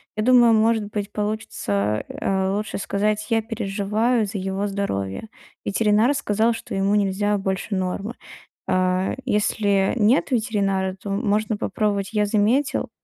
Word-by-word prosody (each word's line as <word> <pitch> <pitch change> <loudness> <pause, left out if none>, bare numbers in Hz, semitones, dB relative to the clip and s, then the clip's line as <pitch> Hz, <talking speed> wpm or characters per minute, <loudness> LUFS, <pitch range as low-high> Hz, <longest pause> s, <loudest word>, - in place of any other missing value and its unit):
Я 215 - -1
думаю, 240 -2 +6
может 220 -1 +3
быть, 205 -1 -3
получится, 155 - -2
э, 190 -1 -1
лучше 210 +2 -3
сказать: 210 +2 -1
"Я 225 0 +3
переживаю 215 +1 0
за 200 0 -5
его 195 +2 -2
здоровье". 195 - -3 0.4
Ветеринар 215 +5 +3
сказал, 225 -3 +1
что 225 - -6
ему 195 +1 +1
нельзя 205 0 +1
больше 195 +2 -3
нормы. 190 +4 -2 0.5
А, 185 0 +1
если 205 -2 +1
нет 230 +7 +3
ветеринара, 200 -5 0
то 205 - -6
можно 210 +1 0
попробовать: 205 -1 -1
"Я 210 -1 +2
заметил, 225 +7 +1
205 Hz, 135 wpm, -23 LUFS, 195-220 Hz, 0.5 s, думаю